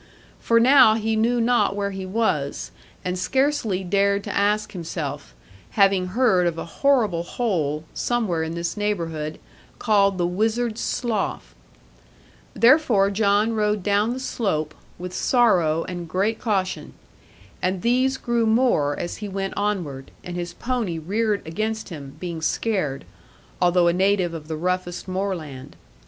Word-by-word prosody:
For 230 0 +3
now 240 -3 +7
he 220 0 -1
knew 235 +2 +2
not 235 -4 +2
where 200 0 -2
he 190 -1 -6
was, 185 -9 -1 0.3
and 180 0 -2
scarcely 250 -4 0
dared 200 +2 +1
to - - -5
ask 210 +1 +1
himself, 165 - -6 0.4
having 195 -2 +4
heard 190 -4 +2
of 170 -1 -2
a - - -4
horrible 215 -3 +1
hole, 170 -7 -2
somewhere 220 -9 -1
in 160 +1 -3
this 170 0 -3
neighbourhood, 165 -7 -3 0.4
called 200 -3 +2
the 175 - +1
Wizard's 220 +5 -1
Slough. 230 -5 -2 1.0
Therefore 235 -6 +4
John 205 +2 +2
rode 210 -2 0
down 205 +3 +2
the 255 - -5
slope, 155 - -2 0.2
with 180 +1 -7
sorrow, 180 -9 +2
and 175 -2 -6
great 200 +6 0
caution. 195 -5 -2 0.7
And 185 0 -1
these 255 +3 +2
grew 235 -3 0
more 220 - +2
as 175 - -4
he 210 -1 -6
went 195 0 -3
onward, 175 -10 -2
and 175 - -6
his 175 -1 -5
pony 235 -9 -2
reared 205 +6 -1
against 215 +7 -3
him, 140 -5 -9
being 170 -2 -5
scared, 160 -6 -1 0.6
although 175 -1 +4
a 170 - +3
native 190 -1 +1
of 155 -2 -7
the 160 -1 -4
roughest 180 +2 -2
moorland. 170 -8 -4
195 Hz, 145 wpm, -23 LUFS, 175-220 Hz, 1.0 s, now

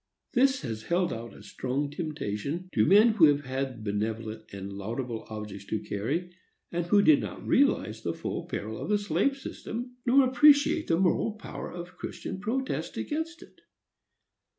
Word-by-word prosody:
This 265 +1 +3
has 115 -5 -4
held 175 +7 0
out 115 +1 -6
a - - -13
strong 140 +3 -2
temptation 150 - -4
to 110 - +3
men 210 +5 +7
who 215 -7 +6
have 145 -1 +3
had 130 -3 -3
benevolent 110 +1 -3
and 100 0 -6
laudable 115 +4 -4
objects 105 -2 -7
to 110 - -1
carry, 145 - -3 0.4
and 175 0 -2
who 200 +3 +5
did 155 -6 +6
not 105 -4 -6
realize - - +2
the - - -2
full - - -4
peril 110 +2 -4
of - - -4
the 210 - +4
slave 205 - +1
system, 245 -2 -6
nor 265 +2 +6
appreciate 295 +4 +5
the 165 - +3
moral 190 +4 +2
power 215 - -7
of 175 +1 -8
Christian 190 - -6
protest 250 +6 -2
against 320 +2 -3
it. - - -20
160 Hz, 165 wpm, -28 LUFS, -, 0.4 s, men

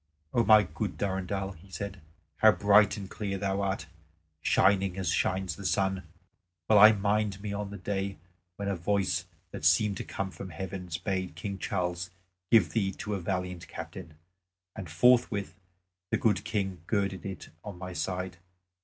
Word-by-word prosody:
"O 120 - +4
my 110 -1 +7
good 95 -2 -4
Durendal," 95 +1 -2
he 95 +1 -15
said, 100 +1 -6 0.4
"how 110 -1 +7
bright 100 +3 +5
and 100 -2 -6
clear 100 0 -3
thou 100 0 -1
art, 95 -4 -1 0.6
shining 95 0 +3
as 95 -2 -1
shines 95 -3 0
the 100 - -9
sun! 95 -2 0 0.6
Well 105 -2 +6
I 105 +2 +10
mind 100 -1 0
me 100 0 -4
of 100 0 -3
the 100 - -7
day 100 0 -3 0.4
when 100 +1 -4
a 100 - 0
voice 90 0 0 0.3
that - - -7
seemed 95 +5 +4
to - - -4
come 95 -1 -4
from 95 0 -8
heaven 90 +2 -6
bade 95 -4 -2
King 100 +2 -5
Charles 90 -1 -2 0.4
give 100 -9 +5
thee 95 0 +1
to 105 - -5
a 100 - -1
valiant 90 -1 -3
captain; 80 0 -8 0.6
and 95 -6 -7
forthwith 105 +2 +3 0.6
the - - +2
good 105 -3 +2
King 95 -4 -2
girded 100 -4 0
it 95 -2 -7
on 100 -4 -7
my 90 0 -6
side. 90 0 -3
95 Hz, 165 wpm, -29 LUFS, 90-100 Hz, 0.6 s, I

